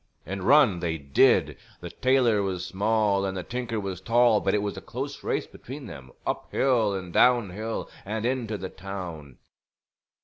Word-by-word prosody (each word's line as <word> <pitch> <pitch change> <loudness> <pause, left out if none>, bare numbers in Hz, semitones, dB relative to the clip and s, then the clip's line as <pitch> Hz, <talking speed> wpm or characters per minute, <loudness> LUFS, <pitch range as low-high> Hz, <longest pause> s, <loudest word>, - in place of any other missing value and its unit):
And 95 +3 -5
run 120 -5 +5
they 80 -2 -2
did! 70 -2 +3 0.2
The 85 -1 -8
tailor 130 -5 +2
was 95 -2 -2
small 100 +1 +1
and 95 -1 -2
the 90 - -4
tinker 120 0 -3
was 95 -3 -5
tall, 115 +1 +4
but 95 0 +1
it 105 - 0
was 100 - -3
a - - -7
close - - -6
race - - -1
between 135 +2 -10
them, 65 - -10 0.2
up - - -3
hill 115 -7 +2
and 90 -2 -6
down 120 -6 +4
hill, 110 +4 -4 0.2
and 110 +3 -3
into 120 -4 -1
the 95 -1 -6
town. 90 -8 -8
100 Hz, 175 wpm, -26 LUFS, 95-115 Hz, 0.2 s, run